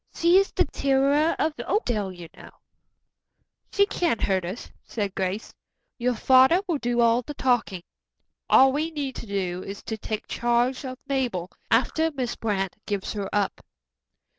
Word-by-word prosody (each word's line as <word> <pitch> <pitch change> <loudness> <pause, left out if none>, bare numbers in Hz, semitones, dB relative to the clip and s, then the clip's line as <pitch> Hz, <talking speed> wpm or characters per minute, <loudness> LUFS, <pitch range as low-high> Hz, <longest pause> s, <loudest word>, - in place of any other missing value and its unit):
"She 340 +2 +4
is 390 - 0
the - - +2
terror 280 +3 +2
of 310 0 0
Oakdale, 235 - -1
you 175 -2 -10
know." - - -12 1.2
"She 400 - +4
can't 340 - 0
hurt 190 -2 +1
us," 185 +7 -7
said 205 -4 -3
Grace. 190 +3 -3 0.5
"Your 245 0 +1
father 260 +8 +5
will 330 -5 0
do 240 -1 0
all 235 +1 +4
the 295 +4 -8
talking. 235 -9 0 0.7
All 265 0 +6
we 310 +3 -1
need 285 -5 -4
to 230 - -8
do 185 -3 -2
is 195 0 -8
to 220 -1 -5
take 215 +1 -4
charge 240 +3 0
of 255 0 -6
Mabel, 240 -10 -2 0.2
after 315 +7 +2
Miss 260 -6 -3
Brant 195 -4 -2
gives 200 -2 -2
her 200 -2 -4
up." 205 -2 -1
240 Hz, 160 wpm, -25 LUFS, 200-275 Hz, 1.2 s, All